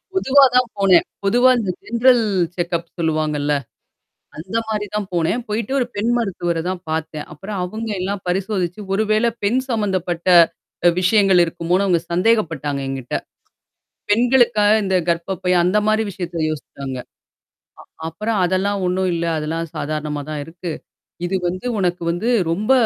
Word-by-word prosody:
பொதுவா 280 Hz, -7 st, +4 dB
தான் 250 Hz, -1 st, +4 dB
போனேன். 190 Hz, -3 st, +5 dB, 0.2 s
பொதுவா 245 Hz, +6 st, +5 dB
இந்த 210 Hz, -5 st, -1 dB
ஜென்ரல் 235 Hz, +1 st, +4 dB, 0.3 s
செக்கப் 170 Hz, -1 st, -2 dB
சொல்லுவாங்கல்ல. 155 Hz, -2 st, 0 dB, 0.8 s
அந்தமாரி 210 Hz, +5 st, -3 dB
தான் 210 Hz, -1 st, -1 dB
போனேன். 175 Hz, +8 st, 0 dB
போயிட்டு 215 Hz, +4 st, -2 dB
ஒரு 250 Hz, -, +1 dB
பெண் 220 Hz, +3 st, 0 dB
மருத்துவர 175 Hz, -7 st, -1 dB
தான் 185 Hz, -1 st, -3 dB
பார்த்தேன். 155 Hz, -1 st, -3 dB
அப்புறம் 195 Hz, +6 st, -6 dB
அவுங்க 220 Hz, +5 st, -5 dB
எல்லாம் 195 Hz, +1 st, -3 dB
பரிசோதிச்சு, 185 Hz, 0 st, -1 dB
ஒருவேளை 215 Hz, +3 st, +2 dB
பெண் 235 Hz, +6 st, +2 dB
சம்மந்தப்பட்ட 185 Hz, -7 st, -1 dB, 0.6 s
அ -, -, +9 dB
விஷயங்கள் 195 Hz, -1 st, +4 dB
இருக்குமோன்னு 175 Hz, +3 st, 0 dB
அவங்க 175 Hz, -3 st, +2 dB
சந்தேகப்பட்டாங்க 170 Hz, -, +1 dB
என்கிட்ட. 135 Hz, -2 st, -5 dB, 1.0 s
பெண்களுக்காக 235 Hz, -2 st, +4 dB
இந்த 190 Hz, -1 st, 0 dB
கர்ப்பப்பை 180 Hz, +2 st, -1 dB
அந்தமாரி 210 Hz, +4 st, +2 dB
விஷயத்த 175 Hz, -3 st, -4 dB
யோசிச்சாங்க. 140 Hz, -3 st, -6 dB, 0.9 s
அ -, -, -23 dB, 0.2 s
அப்புறம் 215 Hz, +6 st, -2 dB
அதெல்லாம் 195 Hz, +3 st, 0 dB
ஒன்னும் 185 Hz, +1 st, 0 dB
இல்ல. 170 Hz, 0 st, -1 dB
அதெல்லாம் 160 Hz, +2 st, -3 dB
சாதாரணமா 150 Hz, 0 st, -3 dB
தான் 150 Hz, -, -3 dB
இருக்கு. 170 Hz, +1 st, -7 dB, 0.5 s
இது 185 Hz, +2 st, 0 dB
வந்து 185 Hz, +6 st, -5 dB
உனக்கு 180 Hz, -2 st, 0 dB
வந்து 175 Hz, +7 st, -2 dB, 0.2 s
ரொம்ப 210 Hz, +8 st, +1 dB
185 Hz, 130 wpm, -20 LUFS, 165-215 Hz, 1.0 s, அ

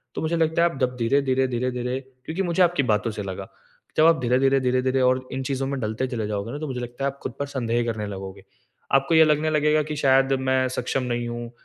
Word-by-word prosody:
तो -, -, -3 dB
मुझे 160 Hz, +1 st, 0 dB
लगता 160 Hz, +1 st, +2 dB
है 170 Hz, -, +4 dB
आप 135 Hz, -, -9 dB
जब 125 Hz, 0 st, +1 dB
धीरे-धीरे, 130 Hz, +2 st, +2 dB
धीरे-धीरे 125 Hz, +1 st, -2 dB, 0.3 s
क्योंकि 165 Hz, +4 st, -3 dB
मुझे 175 Hz, 0 st, 0 dB
आपकी 175 Hz, -4 st, +2 dB
बातों 105 Hz, +2 st, 0 dB
से 105 Hz, -, -5 dB
लगा, 95 Hz, 0 st, -6 dB, 0.5 s
जब 155 Hz, -, +6 dB
आप 165 Hz, -1 st, +5 dB
धीरे-धीरे, 130 Hz, +2 st, +3 dB
धीरे-धीरे 130 Hz, +1 st, +1 dB
और 130 Hz, 0 st, +2 dB
इन 130 Hz, -, -3 dB
चीज़ों 135 Hz, 0 st, -2 dB
में 140 Hz, 0 st, -3 dB
ढलते 110 Hz, +3 st, -2 dB
चले 115 Hz, -5 st, -3 dB
जाओगे 105 Hz, +1 st, -3 dB
ना 145 Hz, -, -5 dB
तो 155 Hz, -, -4 dB
मुझे 130 Hz, -3 st, -4 dB
लगता 120 Hz, +3 st, -5 dB
है 140 Hz, -, +1 dB
आप 140 Hz, -, -20 dB
खुद -, -, -4 dB
पर 140 Hz, -, -1 dB
संदेह 120 Hz, -4 st, -1 dB
करने 110 Hz, -3 st, -2 dB
लगोगे। 95 Hz, -1 st, -8 dB, 0.5 s
आपको 135 Hz, +4 st, +3 dB
ये 160 Hz, -, +8 dB
लगने 155 Hz, 0 st, +2 dB
लगेगा 150 Hz, 0 st, +3 dB
कि 150 Hz, 0 st, -5 dB
शायद 135 Hz, -1 st, +3 dB
मैं 130 Hz, 0 st, +2 dB
सक्षम 130 Hz, +1 st, -2 dB
नहीं 120 Hz, -1 st, -2 dB
हूँ। 120 Hz, 0 st, -6 dB
130 Hz, 235 wpm, -24 LUFS, 120-140 Hz, 0.5 s, ये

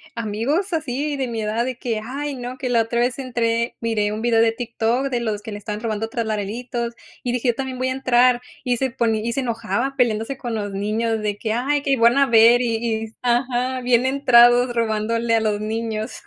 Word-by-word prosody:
amigos 235 Hz, -, -1 dB
así 295 Hz, -1 st, -2 dB
de 265 Hz, -, -1 dB
mi 230 Hz, -2 st, -3 dB
edad, 220 Hz, +3 st, -1 dB
de 255 Hz, -2 st, -4 dB
que, 230 Hz, -4 st, -3 dB
ay 280 Hz, +4 st, -4 dB
no, 250 Hz, 0 st, -6 dB
que 260 Hz, -1 st, -3 dB
la 235 Hz, -2 st, +3 dB
otra 230 Hz, +1 st, -1 dB
vez 250 Hz, +2 st, 0 dB
entré 235 Hz, -2 st, -1 dB
miré 215 Hz, -3 st, 0 dB
un 215 Hz, +1 st, -4 dB
video 230 Hz, -1 st, +3 dB
de 225 Hz, 0 st, +4 dB
TikTok 235 Hz, +2 st, -1 dB
de 245 Hz, -, -1 dB
los 215 Hz, -3 st, -2 dB
que 220 Hz, 0 st, -8 dB
le 205 Hz, -, -5 dB
están 210 Hz, 0 st, -5 dB
robando 225 Hz, -1 st, -2 dB
Tralaleritos. 235 Hz, +2 st, -3 dB, 0.3 s
Y 245 Hz, -, -1 dB
dije: 245 Hz, 0 st, 0 dB
"Yo 235 Hz, -, +1 dB
también 265 Hz, 0 st, -4 dB
voy 255 Hz, +1 st, -1 dB
a -, -, -1 dB
entrar." 250 Hz, -1 st, +3 dB, 0.2 s
Y 245 Hz, -1 st, 0 dB
se 265 Hz, +2 st, 0 dB
poní 225 Hz, -3 st, 0 dB
y 235 Hz, -, -1 dB
se 275 Hz, -, -1 dB
enojaba 240 Hz, +2 st, -2 dB
peleándose 240 Hz, +1 st, 0 dB
con 240 Hz, -3 st, -4 dB
los 205 Hz, -2 st, -3 dB
niños 220 Hz, +3 st, -1 dB
de 205 Hz, -1 st, -2 dB
que, 220 Hz, 0 st, -2 dB
ay, 280 Hz, +4 st, 0 dB
que 280 Hz, -, 0 dB
iban 235 Hz, 0 st, +4 dB
a 275 Hz, -, +5 dB
ver 235 Hz, +1 st, +6 dB
y 230 Hz, -2 st, 0 dB
y 225 Hz, -1 st, -1 dB
s 220 Hz, -, -15 dB
ajá, 250 Hz, +1 st, 0 dB
bien 245 Hz, 0 st, +2 dB
entrados, 245 Hz, -2 st, +5 dB
robándole 230 Hz, +1 st, 0 dB
a 225 Hz, -, +2 dB
los 210 Hz, -1 st, 0 dB
niños. 220 Hz, 0 st, -3 dB
235 Hz, 220 wpm, -21 LUFS, 225-255 Hz, 0.3 s, ver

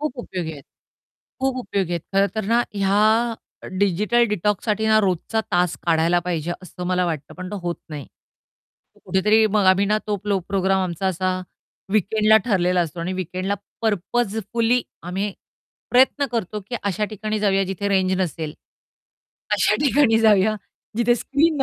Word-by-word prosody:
खूप 295 Hz, -4 st, -3 dB
उपयोगी 180 Hz, -8 st, -4 dB
आहेत 140 Hz, -2 st, -11 dB, 0.8 s
खूप 265 Hz, -1 st, 0 dB
उपयोगी 195 Hz, -7 st, -2 dB
आहेत 170 Hz, -2 st, -2 dB
खरंतर 200 Hz, +2 st, +1 dB
ना 235 Hz, +2 st, +3 dB
ह्या 200 Hz, 0 st, +2 dB, 0.8 s
डिजिटल 205 Hz, +5 st, +2 dB
डिटॉक्ससाठी 210 Hz, +2 st, 0 dB
ना 220 Hz, 0 st, +5 dB
रोजचा 190 Hz, +4 st, 0 dB
तास 175 Hz, -1 st, +2 dB
काढायला 165 Hz, +1 st, +3 dB
पाहिजे 175 Hz, -1 st, -2 dB
असं 180 Hz, 0 st, -7 dB
मला 180 Hz, 0 st, +1 dB
वाटतं, 155 Hz, -4 st, -4 dB
पण 185 Hz, 0 st, -7 dB
तो 205 Hz, -, -4 dB
होत 175 Hz, -1 st, -2 dB
नाही. 145 Hz, -3 st, -6 dB, 0.9 s
तो -, -, -25 dB
कुठेतरी 210 Hz, +4 st, +3 dB
मग 205 Hz, -, +3 dB
आम्ही 195 Hz, +2 st, +2 dB
ना 210 Hz, +1 st, +2 dB
तो 210 Hz, -1 st, 0 dB
प्रो 200 Hz, -2 st, +2 dB
प्रोग्राम 190 Hz, -1 st, +1 dB
आमचा 180 Hz, +2 st, -3 dB
असा 185 Hz, 0 st, 0 dB, 0.6 s
वीकेंडला 215 Hz, +1 st, +4 dB
ठरलेला 180 Hz, -4 st, +2 dB
असतो 170 Hz, 0 st, -3 dB
आणि 175 Hz, +2 st, -2 dB
वीकेंडला 185 Hz, +2 st, -2 dB, 0.3 s
पर्पजफुली 225 Hz, +3 st, 0 dB, 0.2 s
आम्ही 195 Hz, +4 st, -3 dB, 0.6 s
प्रयत्न 265 Hz, +3 st, +4 dB
करतो, 215 Hz, -2 st, -2 dB
की 205 Hz, +5 st, -8 dB
अशा 200 Hz, +1 st, -1 dB
ठिकाणी 215 Hz, 0 st, -3 dB
जाऊया 195 Hz, -1 st, +2 dB
जिथे 195 Hz, +2 st, -3 dB
रेंज 190 Hz, -1 st, +2 dB
नसेल. 160 Hz, -3 st, -3 dB, 1.0 s
अशा -, -, +3 dB
ठिकाणी 265 Hz, -5 st, +4 dB
जाऊया, 215 Hz, -1 st, +4 dB, 0.4 s
जिथे 240 Hz, +1 st, +3 dB
स्क्रीन 285 Hz, +4 st, +1 dB
200 Hz, 150 wpm, -22 LUFS, 180-220 Hz, 1.0 s, ना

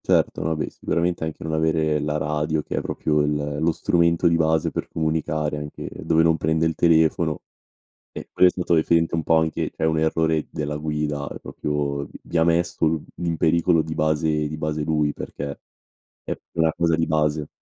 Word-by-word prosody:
Certo, -, -, +2 dB
vabbè 80 Hz, 0 st, -1 dB
sicuramente 85 Hz, 0 st, -1 dB
anche 80 Hz, -, -6 dB
non 80 Hz, 0 st, -3 dB
avere 80 Hz, -1 st, +1 dB
la 75 Hz, +1 st, -1 dB
radio 75 Hz, +1 st, -1 dB
che -, -, -5 dB
è -, -, +1 dB
proprio 75 Hz, -1 st, 0 dB
il 75 Hz, 0 st, -1 dB
lo 85 Hz, +1 st, +3 dB
strumento 85 Hz, +1 st, +2 dB
di 85 Hz, -, +3 dB
base 80 Hz, -1 st, +2 dB
per -, -, -4 dB
comunicare 80 Hz, -1 st, -1 dB
anche 75 Hz, 0 st, -7 dB
dove 80 Hz, 0 st, +1 dB
non 80 Hz, -1 st, +3 dB
prende 80 Hz, +1 st, +1 dB
il 80 Hz, -, +1 dB
telefono, 80 Hz, -1 st, +2 dB, 0.7 s
ehm, -, -, -7 dB
quello 90 Hz, -, +5 dB
è -, -, -1 dB
stato 90 Hz, -1 st, 0 dB
referente 85 Hz, +1 st, +2 dB
un 80 Hz, -, -2 dB
po' 80 Hz, +1 st, +4 dB
anche 80 Hz, -1 st, -1 dB
cioè 80 Hz, -, -2 dB
un 80 Hz, 0 st, +1 dB
errore 80 Hz, 0 st, +1 dB
della 75 Hz, 0 st, -4 dB
guida, 75 Hz, -1 st, -2 dB
ehm, -, -, -8 dB
proprio 70 Hz, -1 st, -2 dB
vi -, -, -13 dB
vi 85 Hz, -, -2 dB
ha 80 Hz, -, +4 dB
messo 85 Hz, 0 st, +1 dB, 0.3 s
i 90 Hz, -, -5 dB
in 85 Hz, -1 st, 0 dB
pericolo 85 Hz, +1 st, +3 dB
di 80 Hz, -, -7 dB
base 75 Hz, 0 st, +1 dB
di 75 Hz, +1 st, -5 dB
base 75 Hz, 0 st, -2 dB
lui 75 Hz, -1 st, +1 dB
perché 70 Hz, 0 st, -6 dB, 0.6 s
è -, -, -4 dB, 0.2 s
una 80 Hz, 0 st, +4 dB
cosa 85 Hz, -1 st, +2 dB
di 80 Hz, 0 st, 0 dB
base. 75 Hz, -1 st, 0 dB
80 Hz, 195 wpm, -23 LUFS, 75-80 Hz, 0.7 s, quello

